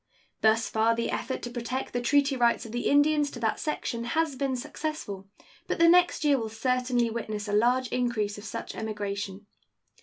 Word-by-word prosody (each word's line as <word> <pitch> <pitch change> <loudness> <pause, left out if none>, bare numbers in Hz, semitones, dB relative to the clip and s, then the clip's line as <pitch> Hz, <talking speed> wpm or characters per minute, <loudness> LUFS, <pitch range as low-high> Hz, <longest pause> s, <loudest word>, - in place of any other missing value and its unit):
Thus 220 +1 +3
far 225 +1 +2
the 235 - -1
effort 260 - -3
to 240 - -5
protect 245 +2 -4
the 245 - -1
treaty 280 +2 +3
rights 240 -2 +2
of 225 - -8
the 240 +1 -2
Indians 295 0 +4
to 240 - -9
that 220 -1 0
section 235 -6 -3
has 315 +3 0
been 270 -1 -1
successful, 280 -7 -5 0.4
but - - -1
the 335 - +5
next 350 -1 +4
year 285 -2 +4
will 225 -1 -3
certainly 245 +1 0
witness 215 -2 -4
a 205 - -3
large 245 +4 +3
increase 220 -5 -1
of - - -11
such 220 - -6
emigration. 205 -2 -4
240 Hz, 185 wpm, -28 LUFS, 220-275 Hz, 0.4 s, the